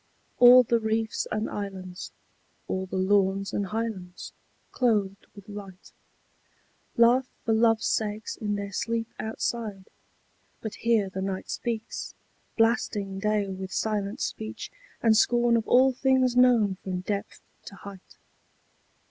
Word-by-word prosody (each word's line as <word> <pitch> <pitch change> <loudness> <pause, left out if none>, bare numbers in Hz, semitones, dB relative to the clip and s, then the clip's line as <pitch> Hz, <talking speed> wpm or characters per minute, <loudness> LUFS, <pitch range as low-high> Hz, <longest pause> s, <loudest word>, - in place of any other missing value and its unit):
All 250 +1 +9
the 235 0 +1
reefs 220 0 -1
and 215 +1 -1
islands, 190 -3 -6 0.6
all 190 0 -2
the 185 - -6
lawns 195 0 +1
and 200 - -1
highlands, 205 -4 -5 0.4
clothed 210 -5 0
with 200 0 -13
light, 200 -3 -10 1.1
Laugh 245 +2 +4 0.2
for 225 - +2
love's 225 0 +3
sake 215 0 -1
in 205 -1 -2
their 200 0 -5
sleep 230 +3 -2
outside: 220 -3 -4 0.7
but 220 - -6
here 225 -4 +1
the 190 0 -5
night 190 0 -4
speaks, 230 -2 -4 0.4
blasting 215 -4 +1
Day 210 0 0
with 190 0 -6
silent 210 -1 -2
speech 220 0 -5 0.3
and 225 -2 +5
scorn 240 +1 +3
of 225 -1 0
all 260 +1 +5
things 260 -1 +2
known 235 -6 +4
from 185 -1 -3
depth 200 +1 -4 0.3
to 195 - -10
height. 195 -1 -12
215 Hz, 130 wpm, -27 LUFS, 195-230 Hz, 1.1 s, All